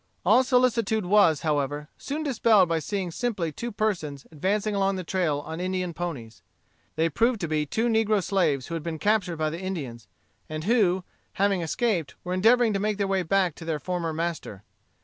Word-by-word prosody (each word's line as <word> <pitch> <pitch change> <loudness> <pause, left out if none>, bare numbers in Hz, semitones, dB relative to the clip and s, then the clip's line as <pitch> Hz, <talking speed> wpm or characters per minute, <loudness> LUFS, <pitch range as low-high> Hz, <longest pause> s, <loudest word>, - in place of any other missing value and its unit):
All 225 +8 +6
solicitude 235 -5 +2
was, 175 -6 +4
however, 145 -1 -1
soon 300 +3 -4
dispelled 225 - +4
by 165 -1 0
seeing 190 +1 -3
simply 195 -5 -2
two 235 +10 -5
persons 175 -10 -2
advancing 200 +7 -1
along 195 -1 +1
the 185 - -4
trail 165 -5 0
on 160 +2 -7
Indian 185 -1 -2
ponies. 120 - -6 0.5
They 160 +1 +2
proved 230 - +1
to 170 - -1
be 150 -1 -1
two 220 +11 -1
negro 220 -3 +2
slaves 165 -10 +1
who 170 - -7
had 165 - -2
been 160 0 -4
captured 200 -2 +1
by 155 -1 0
the 165 +3 -6
Indians, 135 - -5 0.4
and 155 0 -4
who, 190 -4 +2 0.3
having 195 -2 +1
escaped, 175 - -1
were 180 - -3
endeavoring 225 +4 +4
to 195 - 0
make 210 0 -1
their 200 - 0
way 195 -1 +1
back 180 0 +1
to - - -9
their 160 -2 -1
former 170 +2 -3
master. 160 - -4
180 Hz, 190 wpm, -26 LUFS, 160-210 Hz, 0.5 s, All